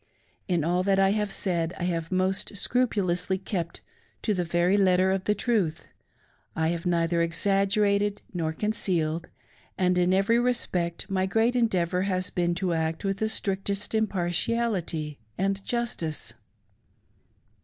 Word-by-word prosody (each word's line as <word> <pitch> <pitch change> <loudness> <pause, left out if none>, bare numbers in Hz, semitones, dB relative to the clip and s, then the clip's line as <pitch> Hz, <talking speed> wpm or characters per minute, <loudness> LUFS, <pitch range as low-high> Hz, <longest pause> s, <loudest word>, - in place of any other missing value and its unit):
In 175 -5 +1
all 175 +3 +1
that 195 +1 +2
I 195 0 +4
have 210 -1 0
said 170 -4 -1
I - - -4
have 165 -2 -2
most 190 +2 -1
scrupulously 195 -6 0
kept 185 -3 -4 0.4
to 215 - +1
the 180 -2 0
very 175 +3 +2
letter 190 -1 +4
of 190 0 -1
the 210 - +2
truth 200 -8 0 0.4
— - - -35 0.3
I 160 0 +1
have 170 +1 -2
neither 170 -1 +2
exaggerated 200 +3 +2
nor 165 -3 -1
concealed, 170 -4 0 0.5
and 180 -1 +2
in 180 +1 +3
every 195 +5 +3
respect 180 -9 0
my 190 -1 0
great 225 +5 +2
endeavor 185 -7 +1
has 185 -1 -1
bfeen 175 -1 0
to 180 -1 -1
act 160 +3 -1
with 195 0 0
the 220 - 0
strictest 200 -1 -2
impar 205 -5 0
tiality 175 -7 -1 0.2
and 195 +1 0
justice. 235 -11 -2
185 Hz, 145 wpm, -27 LUFS, 170-205 Hz, 0.5 s, I